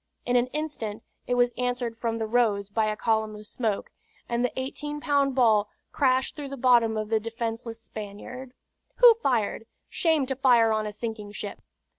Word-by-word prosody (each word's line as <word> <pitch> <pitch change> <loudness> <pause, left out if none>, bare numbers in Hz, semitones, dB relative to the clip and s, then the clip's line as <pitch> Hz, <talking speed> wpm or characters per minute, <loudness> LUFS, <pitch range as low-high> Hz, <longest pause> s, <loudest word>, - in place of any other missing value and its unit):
In 245 - +1
an 245 0 +3
instant 255 -7 -4 0.2
it 245 - +1
was 245 0 +3
answered 245 -2 -1
from 230 0 -2
the 225 - -2
Rose 215 -3 +1
by 215 +1 +1
a 215 0 -2
column 220 -1 0
of 210 0 -10
smoke, 215 -2 -2 0.4
and 235 0 0
the 250 - +1
eighteen 295 +3 -4
pound 285 -3 +1
ball 215 -5 +4 0.2
crashed 260 -2 +1
through 290 -2 -6
the 275 - -6
bottom 235 -3 +4
of 215 -1 -3
the 225 -1 +2
defenceless 230 +1 -5
Spaniard. 225 +4 -8 0.4
"Who 485 -2 +8
fired? 225 -3 0 0.2
Shame 320 -5 +2
to 265 0 -2
fire 240 -4 +4
on 215 0 -1
a - - -4
sinking 210 -1 -6
ship!" 205 -1 -6
235 Hz, 180 wpm, -26 LUFS, 220-255 Hz, 0.4 s, Who